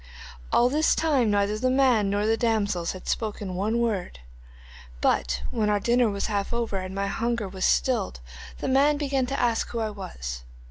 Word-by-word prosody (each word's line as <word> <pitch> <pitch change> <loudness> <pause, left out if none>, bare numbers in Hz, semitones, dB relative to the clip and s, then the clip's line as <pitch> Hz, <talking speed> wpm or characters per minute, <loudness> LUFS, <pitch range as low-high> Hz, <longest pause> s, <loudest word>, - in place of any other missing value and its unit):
'All 240 - +4
this 300 +5 +2
time 280 -8 +2
neither 205 +1 +1
the 255 +2 +1
man 255 -6 +3
nor 205 +1 0
the 225 +1 +3
damsels 210 -7 0
had 185 - -10
spoken 210 -4 -2
one 205 +5 0
word, 220 - -1 0.8
but 60 +1 +1
when 215 -3 0
our 205 -1 +2
dinner 240 +2 +2
was 200 -1 -2
half 200 -2 -2
over, 235 -4 -1
and 185 0 -5
my 200 0 -1
hunger 230 +1 -1
was 190 0 -3
stilled, 235 - +1 0.4
the - - -2
man 285 +3 +3
began 275 -3 0
to 275 - -2
ask 235 -2 +1
who 235 - -4
I 220 -1 -1
was. - - -7
215 Hz, 185 wpm, -26 LUFS, 200-245 Hz, 0.8 s, All